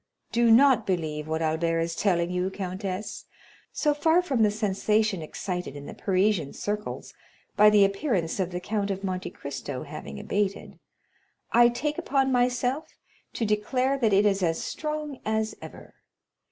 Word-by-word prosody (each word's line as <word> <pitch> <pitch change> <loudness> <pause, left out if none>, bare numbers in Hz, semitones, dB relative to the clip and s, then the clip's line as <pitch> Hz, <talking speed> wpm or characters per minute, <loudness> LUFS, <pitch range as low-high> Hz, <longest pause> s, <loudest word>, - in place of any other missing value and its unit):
Do 235 0 +3
not 240 -1 +5
believe 155 -5 -2
what 160 +1 -1
Albert 165 +1 0
is 165 0 -2
telling 175 -3 +1
you, 180 +1 0
countess; 190 +1 -5 0.5
so 300 -1 +1
far 320 +4 +3
from 270 -9 0
the 215 - +5
sensation 210 -1 0
excited 180 0 -5
in 145 0 -8
the - - -8
Parisian 190 -5 +1
circles 210 +1 -4 0.4
by 210 0 +7
the 210 -1 +6
appearance 195 - -1
of 185 -2 0
the 180 -1 -4
Count 205 +2 -2
of 195 0 -3
Monte 185 -1 -3
Cristo 140 -2 -6
having 70 -1 -8
abated, 200 - -2 0.7
I 240 0 +6
take 295 +5 -2
upon 270 -1 +1
myself 250 +3 +1 0.5
to 230 - -1
declare 250 +6 +1
that 225 -4 +2
it 200 +1 +4
is 200 -1 +2
as 165 -2 +1
strong 300 -3 -4
as 220 0 -1
ever. - - -11
205 Hz, 155 wpm, -26 LUFS, 180-240 Hz, 0.7 s, by